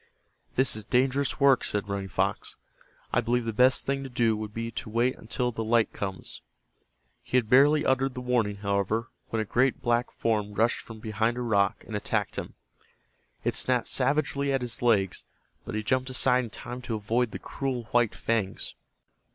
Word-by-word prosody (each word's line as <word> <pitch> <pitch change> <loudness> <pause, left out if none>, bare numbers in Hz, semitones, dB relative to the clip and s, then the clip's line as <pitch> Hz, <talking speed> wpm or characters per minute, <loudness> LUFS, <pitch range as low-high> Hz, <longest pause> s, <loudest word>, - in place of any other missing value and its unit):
"This 130 -3 +2
is 110 - -5
dangerous 130 +5 +1
work," 140 -2 +5
said 105 -1 -2
Running 100 -1 -3
Fox. 95 +1 -1 0.6
"I 125 - +4
believe 120 0 0
the 115 - -2
best 125 +4 +4
thing 135 0 0
to 135 - -6
do 120 -3 +2
would 105 0 -5
be 115 +1 -4
to 110 - -6
wait 120 +4 +1
until 125 +2 -2
the 115 -1 -3
light 115 0 +2
comes." 95 -2 -5 0.8
He 125 - 0
had 120 -4 +2
barely 145 +4 +6
uttered 130 0 +1
the - - -4
warning, 120 -5 +1
however, 100 +3 -1 0.2
when 115 - -1
a 110 - 0
great 130 +5 +2
black 120 0 +1
form 105 -2 -1
rushed 115 +3 +2
from 110 -2 -11
behind 110 +2 0
a - - -2
rock 105 -3 +1
and 110 - -6
attacked 105 - -1
him. - - -5 0.9
It - - +1
snapped 125 -2 +1
savagely 140 +1 +1
at 135 -1 +1
his 120 -2 -4
legs, 105 -6 +2 0.4
but - - -5
he 110 - -1
jumped 130 +3 0
aside 125 0 +2
in - - -8
time 125 +3 -7
to 120 -2 -3
avoid 115 +3 0
the - - -6
cruel 130 -3 -3
white 120 -3 +3
fangs. 110 -4 -1
120 Hz, 185 wpm, -28 LUFS, 110-125 Hz, 0.9 s, barely